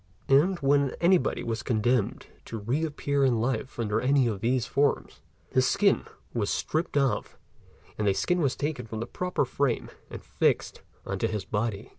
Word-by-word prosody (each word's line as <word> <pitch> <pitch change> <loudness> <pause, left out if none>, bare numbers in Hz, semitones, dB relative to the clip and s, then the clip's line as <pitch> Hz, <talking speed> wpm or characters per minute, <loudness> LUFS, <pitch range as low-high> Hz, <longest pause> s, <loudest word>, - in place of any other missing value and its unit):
and 155 +8 +4
when 140 -1 +2
anybody 175 -5 +2
was 115 -1 -2
condemned 120 -2 0 0.2
to 115 - -6
re 120 +9 -1
appear 145 -2 0
in 125 -4 +3
life 130 +3 -2
under 110 -1 0
any 135 0 +3
one 115 - 0
of 100 - -9
these 120 0 +1
forms, 140 +1 0 0.3
his 130 0 +3
skin 200 +6 +2 0.3
was 105 -4 -1
stripped 160 -1 -1
off 135 -2 0 0.6
and 105 - +1
a 100 - +4
skin 175 - +1
was 140 -4 +1
taken 145 -5 -3
from 110 0 -5
the 115 - -3
proper 180 +4 -1
frame 130 -1 -1 0.2
and - - -8
fixed - - 0 0.2
on - - -3
to - - +1
his 105 -2 -3
body. 105 -1 -2
130 Hz, 180 wpm, -27 LUFS, 115-145 Hz, 0.6 s, and